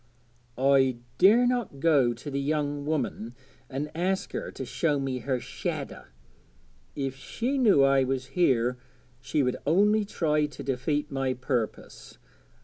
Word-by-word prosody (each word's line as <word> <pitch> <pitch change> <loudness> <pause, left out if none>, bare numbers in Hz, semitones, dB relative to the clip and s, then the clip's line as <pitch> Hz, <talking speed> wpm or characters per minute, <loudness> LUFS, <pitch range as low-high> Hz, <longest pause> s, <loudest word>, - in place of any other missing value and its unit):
'I 135 -1 +3 0.2
dare 225 +6 +6
not 245 - -1
go 140 -6 +4
to 120 +5 -7
the 140 - -1
young 145 0 -1
woman 125 -6 -2 0.3
and 145 +2 -4
ask 185 +3 -1
her - - -4
to 130 - -6
show 145 +3 0
me 135 -2 -2
her 130 +1 -1
"shadder." - - -5 0.9
If 135 -2 -3
she 245 - -3
knew 205 - +5
I 135 -1 +4
was 130 0 -2
here 125 -8 +2 0.4
she 145 +3 0
would 125 -1 0
only 210 +7 +3
try 150 -6 0
to 150 - -9
defeat 145 +3 -1
my 135 -1 -1
purpose. 125 -4 -4
140 Hz, 140 wpm, -27 LUFS, 130-160 Hz, 0.9 s, dare